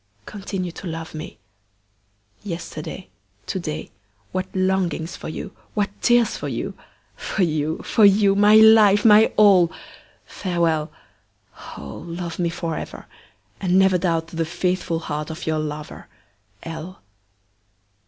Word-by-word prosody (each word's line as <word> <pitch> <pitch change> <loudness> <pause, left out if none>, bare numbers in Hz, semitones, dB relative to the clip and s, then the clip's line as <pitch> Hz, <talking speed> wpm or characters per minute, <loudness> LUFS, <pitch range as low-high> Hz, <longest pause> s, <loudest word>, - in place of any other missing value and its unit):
Continue 195 -3 -5
to 185 - -9
love 165 0 -6
me. 155 0 -8 1.0
Yesterday, 170 -1 -7 0.4
to 190 - -3
day, 155 -3 -5 0.4
what 185 0 -2
longings 185 -3 0
for - - -7
you, 190 +4 -7 0.2
what 205 -2 0
tears 240 -2 +3
for - - -5
you! - - -4 0.4
for 195 - -2
you! 155 -1 0
for 220 - +2
you! 200 0 +6
my 205 +2 +5
life! 220 -2 +7
my 215 0 +7
all! 190 -5 +6 0.5
Farewell! 170 -4 -1 0.9
Oh! 70 -1 -8
love 170 0 -6
me 170 -1 +1
forever, 165 -1 -5 0.5
and 185 -1 +2
never 190 -1 +4
doubt 165 -2 0
the 165 -1 -2
faithful 175 0 -2
heart 150 -1 -4
of 160 - -7
your 155 -1 0
lover, 150 0 -6 0.6
L. 165 - -8
175 Hz, 125 wpm, -22 LUFS, 160-195 Hz, 1.0 s, life